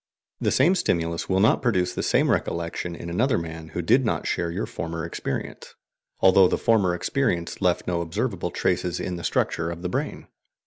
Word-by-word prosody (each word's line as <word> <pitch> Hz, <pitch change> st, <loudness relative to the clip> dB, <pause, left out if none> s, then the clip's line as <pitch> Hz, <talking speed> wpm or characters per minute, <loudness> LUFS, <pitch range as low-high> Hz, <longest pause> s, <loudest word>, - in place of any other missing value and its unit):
The -, -, +1 dB
same 155 Hz, +8 st, +4 dB
stimulus 85 Hz, -, -1 dB
will 95 Hz, 0 st, +2 dB
not 105 Hz, -, +4 dB
produce 90 Hz, -8 st, +1 dB
the -, -, -2 dB
same -, -, +2 dB
recollection 85 Hz, +1 st, -2 dB
in 85 Hz, -, -8 dB
another 115 Hz, +10 st, +1 dB
man 80 Hz, -1 st, -6 dB
who -, -, -4 dB
did -, -, +4 dB
not -, -, -1 dB
share 85 Hz, -, -1 dB
your 85 Hz, -, -2 dB
former 85 Hz, +1 st, -5 dB
experience, 85 Hz, -, -5 dB, 0.5 s
although 95 Hz, 0 st, +7 dB
the -, -, 0 dB
former 100 Hz, -6 st, +2 dB
experience 90 Hz, -5 st, -1 dB
left 90 Hz, -2 st, +1 dB
no 85 Hz, -1 st, -1 dB
OBSERVABLE 80 Hz, -1 st, -2 dB
traces 90 Hz, -1 st, -1 dB
in 90 Hz, -1 st, -3 dB
the 85 Hz, -, -8 dB
structure 85 Hz, 0 st, 0 dB
of 85 Hz, +1 st, -7 dB
the 90 Hz, -, -1 dB
brain. -, -, -3 dB
85 Hz, 185 wpm, -25 LUFS, 85-95 Hz, 0.5 s, although